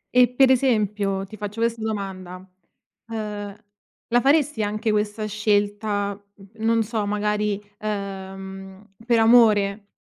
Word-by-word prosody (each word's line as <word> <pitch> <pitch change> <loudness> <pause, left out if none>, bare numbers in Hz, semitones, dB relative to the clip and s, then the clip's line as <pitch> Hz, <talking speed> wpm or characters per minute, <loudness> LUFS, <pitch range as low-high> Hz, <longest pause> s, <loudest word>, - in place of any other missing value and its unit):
E 250 0 +7
per 260 +2 +4
esempio, 210 -6 +1
ti 215 +3 -12
faccio 210 +2 -6
questa 230 0 0
domanda: 195 -4 -4 0.7
uhm, 210 -2 -5 0.5
la 240 +1 +3
faresti, 285 -2 +2
anche, 215 +2 -1
questa 210 +1 -1
scelta, 205 -1 -1 0.4
non 225 +1 +2
so, 220 0 -2
magari, 210 0 0 0.2
uhm, 195 -1 -7
per 235 -1 +4
amore? 215 -3 +4
210 Hz, 115 wpm, -23 LUFS, 200-225 Hz, 0.7 s, E